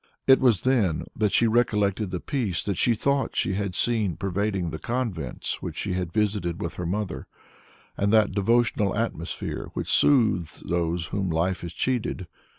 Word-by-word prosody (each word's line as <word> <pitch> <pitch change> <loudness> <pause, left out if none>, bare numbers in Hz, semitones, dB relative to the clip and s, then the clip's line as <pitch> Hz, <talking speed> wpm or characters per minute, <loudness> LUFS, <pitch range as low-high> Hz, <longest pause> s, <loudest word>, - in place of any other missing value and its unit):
It 135 0 +7
was 120 -8 +3
then 110 -12 +1
that 105 -2 +1
she 120 - +3
recollected 105 -3 +1
the 90 -1 -3
peace 115 - -2
that 100 - -1
she 120 +6 +2
thought 140 +4 0
she 95 - 0
had 100 -1 -2
seen 110 -8 +1
pervading 95 -2 -1
the 80 - -5
convents 115 - -3
which - - -6
she 100 - -2
had 90 -2 -2
visited 100 -5 0
with 85 0 -4
her 90 0 -4
mother, 100 +1 -3 0.7
and 100 +1 +1
that 110 -2 +4
devotional 105 0 +2
atmosphere 105 -7 -3
which - - -1
soothes 110 - +3
those 85 0 -1
whom 95 -2 -1
life 85 +3 0
has 85 - -6
cheated. 120 -6 -1
100 Hz, 165 wpm, -25 LUFS, 90-115 Hz, 0.7 s, It